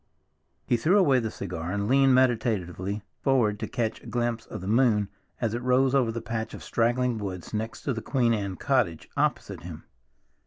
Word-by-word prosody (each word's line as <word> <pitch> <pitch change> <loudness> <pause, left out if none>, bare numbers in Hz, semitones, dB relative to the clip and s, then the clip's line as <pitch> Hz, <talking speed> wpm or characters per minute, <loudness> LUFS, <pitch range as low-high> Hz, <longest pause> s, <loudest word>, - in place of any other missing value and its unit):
He 120 - +2
threw 170 - +3
away 140 -10 +5
the 115 -2 -2
cigar 90 -4 -5
and 100 +1 -1
leaned 135 +1 +5
meditatively 105 -6 0 0.2
forward 115 -7 +2
to - - -3
catch 115 -3 -2
a - - -13
glimpse 120 -2 -2
of - - -6
the 95 - -6
moon 110 -3 +3 0.3
as 115 -2 -1
it 120 - -2
rose 130 +1 +3
over 130 -5 +3
the 115 0 -4
patch 110 -1 -4
of - - -10
straggling 120 0 +1
woods 95 -3 -6
next 110 +1 -4
to 140 - 0
the 115 - -4
Queen 120 -3 +1
Anne 100 -3 -2
cottage 120 - 0
opposite - - -1
him. - - -9
115 Hz, 190 wpm, -27 LUFS, 105-125 Hz, 0.3 s, away